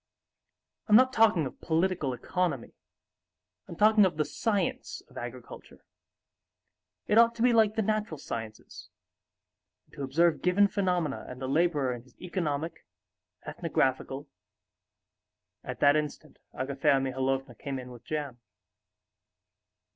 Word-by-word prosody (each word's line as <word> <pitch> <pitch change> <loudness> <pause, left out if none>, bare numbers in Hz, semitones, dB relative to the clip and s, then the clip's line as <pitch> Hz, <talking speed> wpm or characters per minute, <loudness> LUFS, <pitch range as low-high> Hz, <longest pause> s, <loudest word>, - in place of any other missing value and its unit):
I'm 210 - +6
not 255 +2 +6
talking 215 - +4
of 130 - -8
political 165 -3 0
economy, 180 +9 -2 0.9
I'm - - -8
talking 215 0 +5
of 185 -5 +1
the 155 - +1
science 230 +4 -2
of - - -21
agriculture. - - -9 1.2
It 210 - +4
ought 230 0 +5
to 230 - -1
be 245 -1 +5
like 220 -2 +4
the 220 - +1
natural 215 -5 -1
sciences, 110 -5 -8 1.0
and - - -32
to - - -8
observe 155 +4 +2
given 185 +3 +4
phenomena 180 -7 -1
and 125 - -8
the 130 - -4
laborer 145 -3 +1
in 120 - -7
his 125 0 -24
economic, 165 -3 -3 0.6
ethnographical...." 135 +2 -1 1.4
At - - -7
that 145 +1 +6
instant 150 -1 -4
Agafea 140 +1 +1
Mihalovna 135 0 -2
came 135 +3 -5
in 125 -1 -8
with 120 -2 -12
jam. 145 -5 -4
155 Hz, 125 wpm, -29 LUFS, 135-200 Hz, 1.4 s, I'm